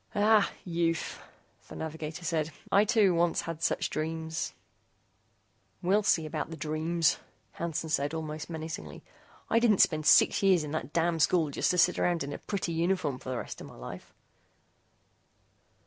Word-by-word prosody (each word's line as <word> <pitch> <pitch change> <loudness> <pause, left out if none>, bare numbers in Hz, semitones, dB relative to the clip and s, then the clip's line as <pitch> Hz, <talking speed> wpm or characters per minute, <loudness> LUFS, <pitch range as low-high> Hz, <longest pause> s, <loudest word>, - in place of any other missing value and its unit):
"Ah, 210 0 +4 0.2
youth!" 165 -2 -1 0.5
the - - -10
navigator 160 +1 -6
said, 160 -1 0 0.2
"I, 200 +2 +5
too, 210 -4 +4
once 170 0 +2
had 165 -1 -6
such - - 0
dreams 160 +1 -3 0.6
" - - -42
"We'll 195 +4 +3
see 165 -6 +2
about 155 0 -4
the 165 - -7
dreams," 160 +2 0 0.3
Hansen 165 -1 -3
said, 145 -2 0
almost 155 -1 -5
menacingly, 160 -1 -6 0.4
"I 230 - +3
didn't 230 -4 +4
spend 155 -4 +3
six - - +6
years 190 -5 +4
in 150 - -6
that 150 -3 -4
damn 165 0 +1
school 160 -1 +3
just - - 0
to 180 - +1
sit 180 +1 +4
around 175 -3 +1
in 140 +1 -5
a - - -6
pretty 195 -4 -3
uniform 165 -5 0
for - - -8
the 130 - -2
rest - - -6
of - - -8
my - - -13
life." - - -9
165 Hz, 165 wpm, -29 LUFS, 155-180 Hz, 0.6 s, six